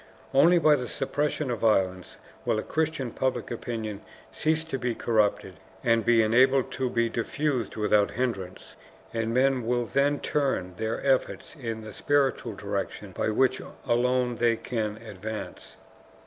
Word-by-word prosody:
Only 165 +6 +6
by 155 -3 +5
the 125 -2 -4
suppression 145 +2 -1
of 120 - -2
violence 95 -5 +1 0.3
will - - +1
a 110 - -2
Christian 155 -6 -1
public 130 +2 -2
opinion 110 -3 -4 0.3
cease 160 +1 0
to 160 -5 -4
be 120 -1 -1
corrupted, 105 -6 0 0.2
and 115 -1 +3
be 120 -1 +4
enabled 130 +4 +4
to 130 -1 -1
be 115 -1 +1
diffused 130 +2 -2
without 105 -1 +3
hindrance, 100 -7 -4 0.4
and 115 0 -1
men 130 +1 +2
will 120 +1 0
then 140 +4 +1
turn 135 -11 -1
their 110 +4 -3
efforts 135 +3 0
in 115 -6 -5
the 110 -1 -9
spiritual 135 -6 +1
direction 100 0 -4
by 100 - -1
which 130 +4 +2 0.2
alone 125 0 +1
they 120 -1 +3
can 110 -2 -3
advance. 110 +1 -7
120 Hz, 150 wpm, -27 LUFS, 110-135 Hz, 0.4 s, Only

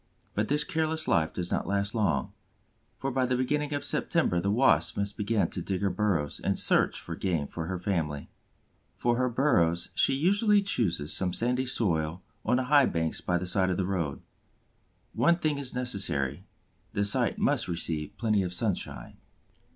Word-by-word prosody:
But 105 +1 -1
this 150 +1 +1
careless 160 0 -1
life 80 -3 +2
does 90 -1 -4
not - - -1
last 100 +1 0
long, 110 -3 0 0.6
for 135 - -3
by 130 0 +1
the 125 0 0
beginning 150 +3 -1
of 145 0 -2
September 90 - +1
the 100 +3 -1
Wasp 125 +6 +3
must 100 0 -2
begin 105 -1 0
to 90 - -3
dig 95 +2 -3
her 100 -1 +1
burrows 95 -9 -1
and - - 0
search - - +2
for 85 - -7
game 85 -5 -1
for 80 +2 -6
her 95 0 -3
family. 80 -6 -2 0.7
For 120 0 +1
her 130 0 +1
burrows 85 - +2
she 135 - +3
usually 200 +7 +3
chooses 90 - 0
some 90 -2 0
sandy 125 +4 0
soil 85 -7 -1 0.2
on 125 - +2
the 130 - 0
high 140 +1 +5
banks 80 -1 -1
by 90 - 0
the 90 - -4
side 95 0 +3
of 90 - -1
the 95 - 0
road. 85 -7 -3 0.9
One 170 0 +3
thing 155 -4 -1
is 135 -3 -3
necessary: 95 - -1 0.5
the 100 - 0
site 100 - +2
must - - +1
receive 80 -3 -3
plenty 110 -3 +1
of 90 -1 -3
sunshine. 90 - -3
100 Hz, 180 wpm, -28 LUFS, 85-130 Hz, 0.9 s, high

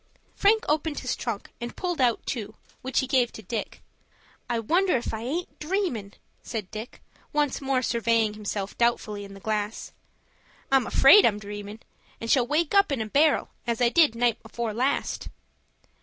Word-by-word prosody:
Frank 435 +3 +3
opened 300 0 0
his 255 -1 -2
trunk 230 -4 -5
and 240 0 -5
pulled 355 -5 -2
out 240 -3 +2
two, 215 -4 -4 0.3
which 260 +1 0
he - - -2
gave 255 -2 +2
to 220 - -10
Dick. 215 +3 -5 0.7
"I 240 - 0
wonder 345 - +2
if 240 - -4
I 220 - -4
aint 310 +9 -4
dreamin'," 305 - -2 0.3
said 215 -6 -5
Dick, 220 +3 -8 0.3
once 295 -2 0
more 270 -2 0
surveying 230 -2 +1
himself 205 -1 -4
doubtfully 215 -3 0
in 195 0 -11
the - - -11
glass. 210 +1 -3 0.8
"I'm 265 -3 +4
afraid 340 +10 +7
I'm 210 -3 +3
dreamin', 205 +1 -8 0.4
and 230 - -2
shall 250 -3 +4
wake 305 +5 +1
up 395 -5 +4
in 275 - 0
a 220 - -1
barrel, 290 +7 +2 0.2
as 235 -1 0
I 245 -1 +4
did 300 -3 +4
night 235 -1 +1
afore 235 -2 -4
last." 255 +5 -1
240 Hz, 170 wpm, -26 LUFS, 215-285 Hz, 0.8 s, afraid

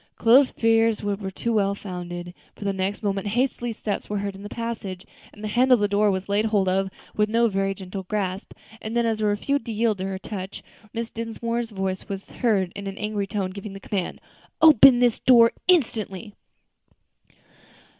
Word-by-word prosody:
Chloe's 255 +4 +5
fears 225 -1 +2
were 205 -1 0
but 195 -1 -7
too 235 - -1
well 200 -2 +2
founded; 175 -2 -7 0.2
for - - -9
the 200 - 0
next 190 +3 -3
moment 200 0 -1
hasty 240 +2 0
steps 215 -2 -4
were 205 - -1
heard 200 0 -3
in 195 - -11
the 205 - -7
passage, 220 -6 -5 0.3
and 210 - -14
the - - -2
handle 250 +4 +4
of - - -2
the 205 - +2
door 205 +1 +2
was 190 -1 -2
laid 205 +2 +1
hold 205 -3 +1
of 190 +1 +1 0.3
with 210 0 +2
no 230 +1 +3
very 195 -1 -1
gentle 190 0 -6
grasp; 190 0 -3 0.3
and 220 +2 -3
then, 235 - +2
as 220 -1 0
it - - +1
refused 225 +6 0
to - - -3
yield 220 -2 0
to 190 - -2
her 190 -1 -3
touch, 190 0 -7 0.3
Mrs. 230 0 -4
Dinsmore's 230 +1 -3
voice 190 -1 -4
was 195 -1 -6
heard 200 -7 +1
in 200 0 -6
an 195 0 -6
angry 210 -1 -2
tone 195 -2 -2
giving 200 +1 -8
the 195 - -8
command, 195 -3 -3 0.4
"Open 275 -5 +8
this 240 -2 +3
door 235 -2 +6 0.2
instantly." 220 - +1
205 Hz, 195 wpm, -24 LUFS, 195-230 Hz, 0.4 s, Open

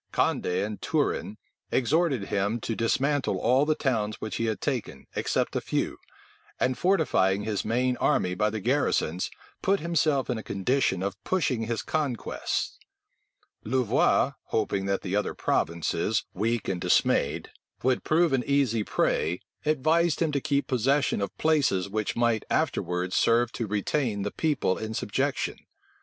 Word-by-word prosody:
Condé 90 +3 +1
and 105 0 -6
Turenne 145 -8 -1 0.3
exhorted 140 - +2
him 100 +4 0
to 115 - -2
dismantle 135 +5 +1
all 130 +5 +3
the 155 - +3
towns 110 -7 -1
which 110 -3 -4
he 115 - 0
had 110 -2 -1
taken, 130 -6 -3
except - - 0
a - - 0
few; - - -2 0.6
and 130 - +1
fortifying 125 - +2
his 105 -2 -1
main 125 +3 +1
army 90 - +1
by 105 +4 +1
the 110 +1 -4
garrisons, 110 - 0 0.3
put 195 +1 +2
himself 155 -4 +1
in 120 -3 -1
a - - -5
condition 100 -1 0
of 100 0 -4
pushing 130 -11 0
his 115 -1 -2
conquests. 145 -7 -2 0.8
Louvois, 130 +3 +2
hoping 100 -3 -1
that 100 0 -1
the 95 0 -2
other 105 -1 -1
provinces, 85 +6 0
weak 115 +3 -1
and 90 -2 -2
dismayed, - - +2 0.3
would 130 0 +2
prove 165 -1 +3
an 130 -2 +2
easy 135 -6 +2
prey, 85 -3 0 0.3
advised 155 +3 +2
him 160 -2 +1
to 140 -1 -1
keep 140 0 0
possession 135 0 +1
of 100 - -4
places 145 - +2
which 105 +1 -2
might 115 -2 +2
afterwards 90 +1 0
serve 115 0 +3
to 115 - -3
retain 105 +1 -1
the 105 - -2
people 150 - 0
in 110 0 -4
subjection. - - -1
115 Hz, 150 wpm, -27 LUFS, 105-140 Hz, 0.8 s, all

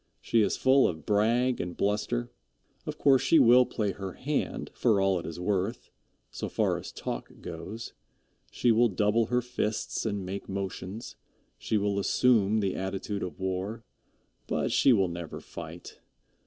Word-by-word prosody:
She 115 - +2
is 105 - +1
full 130 +1 +5
of 80 -2 -5
brag 120 +5 +2
and 90 0 -6
bluster. 100 - -1 0.6
Of - - -4
course 135 -2 +4
she 165 - +4
will 125 0 +7
play 105 -3 -1
her 95 -1 -6
hand 145 +2 -3
for 110 -5 +2
all 95 -2 +2
it - - -7
is 85 +1 -6
worth, 100 +4 -2 0.4
so - - -5
far - - +1
as - - -8
talk - - -5
goes. 110 +4 -7 0.6
She 120 - +2
will 115 +1 +4
double 105 +3 +2
her 125 0 +1
fists 115 -3 -2
and 100 -4 -2
make 95 +2 -6
motions. 95 +2 -5 0.4
She 110 - 0
will 100 -1 0
assume 110 0 +3
the 95 -2 -1
attitude 95 +2 -3
of 90 - -5
war, 95 +4 -3 0.6
but - - -1
she 135 - +5
will 100 -6 +4
never 85 -2 -6
fight. 85 +1 -10
105 Hz, 160 wpm, -28 LUFS, 95-115 Hz, 0.6 s, will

